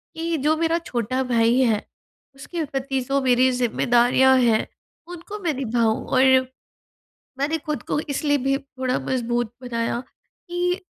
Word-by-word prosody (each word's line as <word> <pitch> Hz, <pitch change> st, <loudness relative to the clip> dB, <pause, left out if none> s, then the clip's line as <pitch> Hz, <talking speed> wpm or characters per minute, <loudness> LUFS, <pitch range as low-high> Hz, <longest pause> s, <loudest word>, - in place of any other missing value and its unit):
कि 330 Hz, 0 st, -2 dB
जो 300 Hz, +3 st, +2 dB
मेरा 330 Hz, 0 st, +1 dB
छोटा 245 Hz, +2 st, -1 dB
भाई 235 Hz, +1 st, +3 dB
है 225 Hz, -4 st, +3 dB, 0.6 s
उसके 325 Hz, +5 st, -5 dB
प्रति 270 Hz, -1 st, -2 dB
जो 275 Hz, 0 st, +1 dB
मेरी 255 Hz, 0 st, +4 dB
ज़िम्मेदारियाँ 245 Hz, +2 st, +3 dB
हैं, 230 Hz, -3 st, +2 dB, 0.4 s
उनको 355 Hz, +4 st, -8 dB
मैं 320 Hz, -3 st, +1 dB
निभाऊँ। 230 Hz, -4 st, 0 dB
और, 260 Hz, 0 st, +2 dB, 1.2 s
मैंने 305 Hz, +4 st, 0 dB
ख़ुद 300 Hz, 0 st, -4 dB
को -, -, 0 dB
इसलिए 290 Hz, -1 st, 0 dB
भी 275 Hz, 0 st, +2 dB
थोड़ा 260 Hz, -2 st, -3 dB
मज़बूत 240 Hz, -2 st, -1 dB
बनाया 235 Hz, -1 st, -2 dB, 0.5 s
कि 355 Hz, +1 st, -1 dB
265 Hz, 135 wpm, -23 LUFS, 240-300 Hz, 1.2 s, मेरी